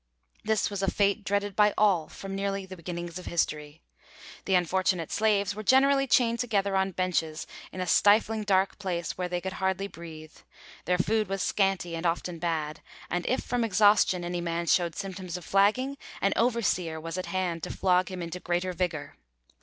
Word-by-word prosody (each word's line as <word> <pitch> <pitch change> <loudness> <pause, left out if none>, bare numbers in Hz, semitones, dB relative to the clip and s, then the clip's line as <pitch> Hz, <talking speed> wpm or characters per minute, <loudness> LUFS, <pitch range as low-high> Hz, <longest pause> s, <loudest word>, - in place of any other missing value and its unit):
This 215 -1 +1
was 200 -1 -3
a 195 - +2
fate 200 +1 +1
dreaded 200 0 -1
by 210 -1 +4
all 190 -7 +3
from 195 0 -8
nearly 195 0 -2
the 190 0 -9
beginnings 175 0 -6
of 180 - -10
history. 150 -2 -2 0.6
The 190 - +2
unfortunate 180 -1 +1
slaves 205 -2 +2
were 215 - -6
generally 275 +4 +4
chained 235 -2 +3
together 200 -5 0
on 190 0 +2
benches 165 -3 -1 0.3
in 185 - -5
a - - -1
stifling, 215 +3 +4
dark 195 -1 +1
place, 175 -4 -3
where 180 -1 -3
they 180 0 -1
could 190 +1 -5
hardly 190 +1 0
breathe; 160 -4 -10 0.5
their 180 - +2
food 215 +4 +1
was 195 -1 -1
scanty 195 -4 0
and 165 +1 -1
often 170 0 -2
bad, 160 -3 -2 0.3
and 175 0 -1
if 255 - +1
from 245 -1 -1
exhaustion 205 -3 +4
any 175 0 -3
man 170 0 -2
showed 170 -1 +2
symptoms 185 -2 -5
of 175 - -10
flagging, 255 +8 +2 0.2
an 195 - +2
overseer 205 -9 +1
was 165 +3 -5
at 180 - -5
hand 175 -2 -2
to - - -5
flog 185 0 +2
him 185 -2 -5
into 170 +2 -5
greater 180 +1 -1
vigour. 160 -5 -3
185 Hz, 185 wpm, -28 LUFS, 175-205 Hz, 0.6 s, by